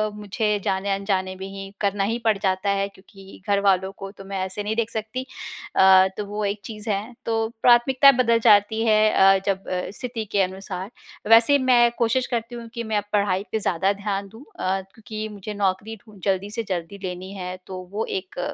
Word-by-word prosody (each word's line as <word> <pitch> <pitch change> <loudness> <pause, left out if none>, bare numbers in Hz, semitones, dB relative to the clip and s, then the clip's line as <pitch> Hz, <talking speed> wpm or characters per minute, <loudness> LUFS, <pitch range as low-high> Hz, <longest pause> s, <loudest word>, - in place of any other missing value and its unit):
मुझे 210 0 -1
जाने-अनजाने 195 -1 -1
में 190 +1 -7
ही 195 0 -8
करना 200 -1 +1
ही 225 +4 0
पड़ 220 -2 +3
जाता 190 0 0
है, 200 0 +1
क्योंकि 195 0 -16
घर 200 -1 +3
वालों 190 -1 +2
को 195 - -7
तो 195 -1 -13
मैं 195 0 -4
ऐसे 190 +2 -4
नहीं 215 +1 -2
देख 230 -1 0
सकती। 220 +4 -4 0.5
अ, 190 0 +7
तो 210 - -3
वो 210 +1 -4
एक 200 +1 -2
चीज़ 215 0 -7
है। 210 +4 -2
तो 225 -1 0
प्राथमिकता 255 +3 +6
बदल 230 -1 +3
जाती 215 0 +4
है 215 -1 +4
अ, 195 0 +6
जब 195 -1 -1 0.3
स्थिति 240 -3 -4
के 200 - +3
अनुसार। 190 0 -4 0.4
वैसे 230 +5 +7
मैं 240 -1 +5
कोशिश 240 +2 +1
करती 235 0 -3
हूँ 235 -1 -8
कि 235 -1 -4
मैं 220 -2 -1
अब 205 - 0
पढ़ाई 200 -2 +1
पर - - +2
ज़्यादा 195 0 +1
ध्यान 200 0 -3
दूँ 225 +7 -14
अ, 190 +1 0
क्योंकि 215 -1 -6
मुझे 210 0 -7
नौकरी 200 +2 -1
ढूँढ 210 -3 -16
जल्दी 195 0 0
से 230 +1 -3
जल्दी 180 +1 -3
लेनी 185 +1 -5
है। 180 -1 -5
तो 185 -1 -6
वो 215 +2 -2 0.2
एक 185 -1 -12
200 Hz, 195 wpm, -23 LUFS, 195-220 Hz, 0.5 s, अ